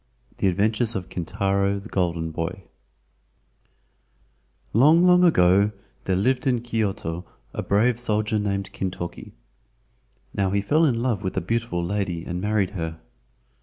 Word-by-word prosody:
THE - - +2
ADVENTURES 110 +5 +1
OF 95 -1 -4
KINTARO, 100 +3 0
THE 100 +2 -8
GOLDEN 85 -3 -1
BOY 85 +4 -4 2.1
Long, 155 - +6
long 180 0 +6
ago 100 - +4 0.3
there 95 - +1
lived 130 +9 +1
in 125 -3 +2
Kyoto 100 -7 -2 0.3
a - - -3
brave 115 +4 +2
soldier 110 -2 0
named 100 -1 -2
Kintoki. 90 -2 -5 1.0
Now 100 -1 0
he 100 +1 +1
fell 155 +11 +3
in 120 -5 +1
love 120 -6 0
with 95 -1 -4
a - - +4
beautiful 115 -2 -1
lady 90 -3 -2
and 90 0 -4
married 105 -2 +1
her. 80 -4 -5
100 Hz, 135 wpm, -24 LUFS, 90-115 Hz, 2.1 s, Long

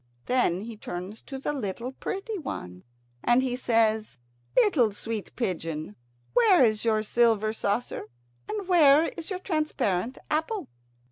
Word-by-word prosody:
Then 245 -8 +2
he 225 +1 -7
turns 185 +2 -6
to 270 - -7
the 275 +2 -2
little 235 -1 -4
pretty 395 - -4
one, 90 - -6 0.4
and 240 +2 +4
he 250 -2 -1
says: 220 - +1 0.4
"Little 305 - +4
sweet 220 0 -5
pigeon, 165 - -3 0.4
where 405 - +6
is 215 -2 +1
your 220 -2 +2
silver 220 -1 +2
saucer, 220 -2 -2 0.4
and 415 -3 -3
where 315 -4 +6
is 335 -2 -7
your 375 - -2
transparent 285 - -1
apple?" 320 - -1
240 Hz, 135 wpm, -27 LUFS, 215-310 Hz, 0.4 s, where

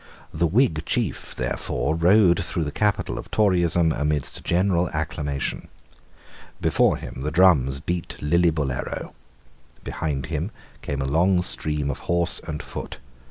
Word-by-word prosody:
The 85 +2 +1
Whig 85 - +2
chief, - - -2
therefore, 75 - -2
rode 85 +2 +4
through 85 - -2
the 75 - -3
capital 105 +4 0
of - - -9
Toryism 85 -5 +2
amidst 75 -1 -2
general 90 0 +1
acclamation. 75 -2 -3 0.9
Before - - +2
him 65 - -8
the 75 - -1
drums 75 -6 +4
beat 85 +3 -4
Lillibullero. 75 -4 0 0.7
Behind 70 -4 -3
him 80 +3 -3 0.3
came 70 -1 -3
a - - -2
long 90 +6 +2
stream 75 -4 0
of - - -6
horse 85 -1 +2
and 75 -1 -4
foot. - - -7
80 Hz, 130 wpm, -24 LUFS, 75-90 Hz, 0.9 s, rode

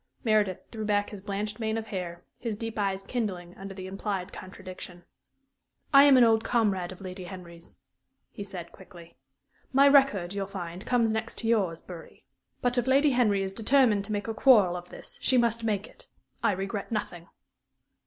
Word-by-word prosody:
Meredith 215 -5 +2
threw 220 -2 -5
back 205 -1 0
his 205 -3 -8
blanched 210 +2 -4
mane 220 -1 -1
of 225 - -4
hair, 180 -4 -6 0.2
his 225 -4 -3
deep 225 -1 -5
eyes 195 -1 -1
kindling 190 -6 -4
under 195 0 -8
the 185 -1 -7
implied 195 -1 -4
contradiction. 185 -1 -10 0.9
"I 275 +1 +9
am 280 -2 +7
an 250 - +7
old 225 -1 +4
comrade 200 -7 0
of 185 - -11
Lady 185 -1 -7
Henry's," 175 -2 -11 0.5
he 205 - -7
said, 180 -4 -8
quickly. 170 -3 -15 0.6
"My 275 +1 +6
record, 270 -11 +4
you'll 200 -1 -3
find, 180 -2 -7
comes 235 -3 +2
next 220 +1 -3
to 225 - -4
yours, 195 -8 +1
Bury. 175 -3 -12 0.4
But 245 0 +2
if 245 - -2
Lady 275 +2 +4
Henry 215 -6 +2
is 190 0 -4
determined 225 -1 +3
to 215 - -7
make 205 0 -2
a 225 - -2
quarrel 215 -7 +5
of 180 0 -8
this, - - -10
she 255 - +3
must 235 -1 +2
make 210 -2 -1
it. - - -18 0.3
I - - +2
regret 195 +4 -4
nothing." 175 -6 -4
205 Hz, 185 wpm, -28 LUFS, 185-225 Hz, 0.9 s, I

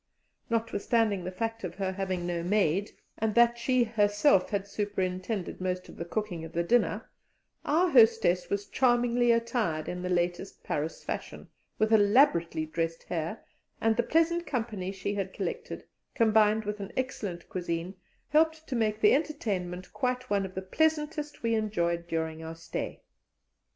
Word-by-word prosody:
Notwithstanding 225 -3 +1
the 185 - -3
fact 225 +3 -3
of 175 -2 -5
her 190 -1 -2
having 190 -2 -3
no 175 -1 -2
maid, 195 +1 +1 0.3
and 220 -1 0
that 235 0 +5
she 255 +1 +3
had 225 -1 -7 0.2
herself 205 -1 +3 0.2
superintended 195 -1 -3
most 185 0 -2
of - - -12
the 170 - -4
cooking 180 -3 -3
of 165 - -9
the 170 - +1
dinner, 240 +7 +1 0.6
our 335 +5 +3
hostess 225 - +4
was 200 0 -1
charmingly 240 0 +3
attired 230 -9 0
in 180 0 -4
the 180 - -3
latest 175 +1 -1
Paris 155 +2 -3
fashion, - - -6 0.3
with 215 +1 +2
elaborately 205 - +4
dressed 165 +1 -3
hair, 165 +5 -4 0.4
and 225 0 +2
the 240 - +3
pleasant 330 +4 +1
company 220 -7 -3
she 195 +1 -3
had 195 -2 -3
collected, - - -4 0.3
combined 220 -1 +4
with 210 0 -3
an 200 - -6
excellent 210 -9 -3
cuisine, 175 0 -3 0.4
helped 315 +1 +2
to 260 - -3
make 215 -2 0
the 210 - +6
entertainment 195 - -2
quite 255 -2 -2
one 200 -1 +1
of 185 - -15
the 190 - -3
pleasantest 300 +5 -1
we 230 0 +1
enjoyed 170 -6 0
during 160 -1 -3
our 160 0 -6
stay. 165 - -5
205 Hz, 155 wpm, -29 LUFS, 180-235 Hz, 0.6 s, the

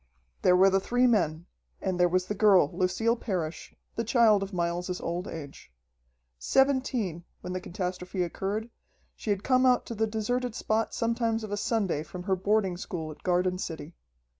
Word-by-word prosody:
There 180 - +5
were 190 +1 +6
the 195 - +3
three 245 +5 +2
men 170 -9 +2 0.3
and 185 -2 -2
there 175 0 +5
was 185 +1 +1
the 205 - -3
girl, 195 -7 +4
Lucille 225 +6 +1
Parrish, 180 -9 -4 0.2
the 230 - -1
child 225 -3 +4
of 195 0 -4
Miles's 175 0 -2
old 175 +3 -3
age. 145 - -9 0.7
Seventeen, 255 - +1 0.2
when 180 - -5
the 185 - -3
catastrophe 180 0 -3
occurred, 205 +6 -3 0.4
she - - -7
had 200 -1 0
come 255 -1 +3
out 250 -1 +4
to - - -5
the 220 0 0
deserted 230 +2 -2
spot 220 +1 -1
sometimes 230 -1 0
of 215 - -6
a - - 0
Sunday 205 -7 0
from 180 +3 -8
her 190 0 +1
boarding 195 -1 +1
school 170 -5 -5
at 150 - -13
Garden 180 0 +1
City. 160 -2 -6
195 Hz, 175 wpm, -28 LUFS, 180-225 Hz, 0.7 s, were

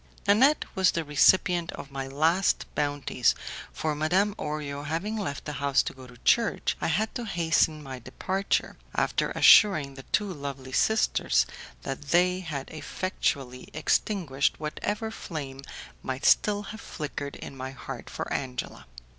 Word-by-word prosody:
Nanette 260 +9 +5
was 190 -1 +4
the 165 - -1
recipient 170 +3 +3
of 140 - -9
my 135 -1 -4
last 160 +7 +2
bounties, 145 -4 +1 0.4
for 155 -1 -2
Madame 180 +7 +2
Orio 150 -5 -4
having 165 +9 -2
left 185 -10 -4
the 150 - -4
house 140 -1 +3
to - - -5
go 130 -1 -12
to 125 -1 -15
church, 230 -3 +3
I - - +1
had 210 +7 0
to 245 - -4
hasten 160 -4 +1
my 130 -2 -7
departure, 190 +10 -2 0.2
after - - +1
assuring 155 -10 +6
the 135 - -9
two 205 -3 +1
lovely 140 -3 -6
sisters 95 - +2 0.4
that 135 - -4
they 180 +3 +3
had 150 -7 -5
effectually 140 -6 -3
extinguished 155 -3 +1
whatever 205 +8 -3
flame 140 -10 -6 0.4
might 130 +1 -4
still 205 -1 +4
have 220 - -9
flickered 145 -2 -5
in 135 - -9
my 130 0 -5
heart 135 - -8
for - - -4
Angela. 125 - -4
155 Hz, 145 wpm, -27 LUFS, 135-190 Hz, 0.4 s, assuring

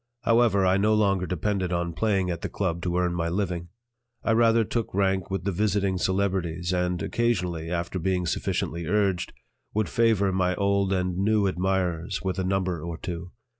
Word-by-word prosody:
However, 115 -4 +4
I 95 +1 +4
no 105 +2 +3
longer 100 -4 +2
depended 95 0 -1
on 85 -1 -1
playing 95 -2 +1
at 85 - -4
the - - -3
"Club" 85 -4 -2
to 90 0 -1
earn 90 -1 +1
my 85 -1 -1
living; 90 -2 -2 0.6
I - - +1
rather 115 0 +4
took 115 +1 -2
rank 95 -1 +1
with 95 -3 -2
the 100 - 0
visiting 100 -1 0
celebrities 95 -3 0
and, 90 -1 0
occasionally, 90 -9 -1
after 85 +1 -2
being 90 +1 0
sufficiently 85 0 -2
urged, 95 -2 +1 0.4
would 110 0 +1
favor 110 -5 +2
my 90 -1 +1
old 100 0 +1
and 90 -2 0
new 105 +1 +2
admirers 90 -1 -1
with 95 0 -2
a - - 0
number 95 -3 -1
or 85 0 -5
two. 90 0 -6
95 Hz, 175 wpm, -26 LUFS, 90-100 Hz, 0.6 s, However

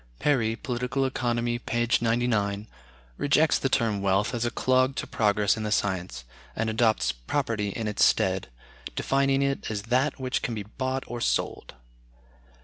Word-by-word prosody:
Perry 115 - +1
("Political 125 +2 -2
Economy," 120 -2 -1
p. 120 0 -1
99) 110 -3 0 0.5
rejects 150 +2 +3
the 135 - 0
term 110 -5 +1
wealth 100 +1 +1
as 120 -1 -1
a - - +1
clog 130 +2 +2
to - - -3
progress 105 -1 +2
in 110 - -5
the 105 -1 -3
science, 90 - -1 0.3
and 110 0 -1
adopts 110 0 +2
property 105 - -2
in 110 +2 -4
its 105 - +1
stead, - - +2 0.5
defining 135 0 +2
it 140 0 -1
as 105 -2 -3
that 130 +6 +1
"which 130 -1 -1
can 120 - -2
be 105 - -4
bought 130 +5 -3
or 120 0 -6
sold." - - -1
120 Hz, 155 wpm, -27 LUFS, 105-130 Hz, 0.5 s, rejects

